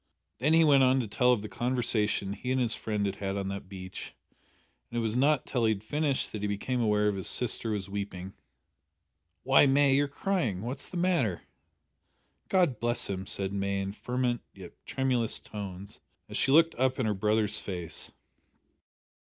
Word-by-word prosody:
Then 150 +6 +2
he 165 0 +6
went 145 -3 +5
on 130 0 +4
to 115 - -4
tell 125 +4 +3
of 115 -4 +1
the - - -4
conversation 110 -5 0
he 125 +5 -4
and 130 - +1
his 120 -3 +1
friend 105 -2 -2
had 100 0 -2
had 100 0 -3
on 95 -1 -2
that 100 -1 -6
beach, 95 -1 -8 0.7
and 120 - -5
it - - +2
was 110 -1 -1
not 140 +2 +3
till 120 -3 0
he 110 - +4
had 100 0 -8
finished 145 +2 0
that 105 - -5
he 105 - -1
became 120 +5 -2
aware 105 -1 +2
that 100 - -5
his 95 - -1
sister 120 -1 +2
was 100 -3 -2
weeping. 100 -2 -5 1.1
"Why, 135 +2 +6
May, 140 0 +4
you're 145 +1 +3
crying. 140 - -1
What's 130 +4 -4
the 180 - -6
matter?" 170 - +1 1.1
"God 175 - +2
bless 120 -3 +1
him!" 95 0 -5
said 95 0 -3
May 100 0 -1
in 95 0 -3
fervent 125 +2 -2
yet 95 -3 -10 0.2
tremulous 125 -4 0
tones 100 -2 -8 0.3
as - - -8
she 135 - +2
looked 165 +3 +5
up 130 0 +2
in 130 - 0
her 105 - +1
brother's 105 +1 0
face. 90 -4 -5
110 Hz, 185 wpm, -29 LUFS, 100-130 Hz, 1.1 s, he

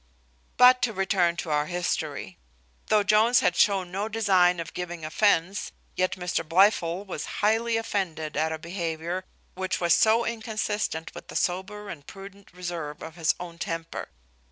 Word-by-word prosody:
But 250 +1 +7
to 230 - +1
return 190 -3 +1
to 170 -2 -4
our 150 0 +1
history. 155 - -3 0.5
Though 210 -1 +4
Jones 215 +4 +4
had 175 - +2
shown 190 -2 +2
no 200 +3 -2
design 190 -5 +3
of 165 -1 -6
giving 175 -2 -5
offence, 195 +2 +1 0.2
yet 185 0 +1
Mr 180 -1 -2
Blifil 175 +1 +3
was 180 -6 -5 0.2
highly 225 +2 +2
offended 175 -9 -3
at 160 +2 +1
a 160 - -2
behaviour 170 +1 -4 0.3
which 185 0 -2
was 170 -1 +3
so 225 +4 +4
inconsistent 215 -7 -3
with - - -10
the - - -10
sober 195 +3 -2
and 145 -7 -9
prudent 195 0 -12
reserve 170 -4 -6
of 160 - -8
his 165 -2 +1
own 170 -1 -8
temper. 165 -1 -4
180 Hz, 155 wpm, -26 LUFS, 165-205 Hz, 0.5 s, But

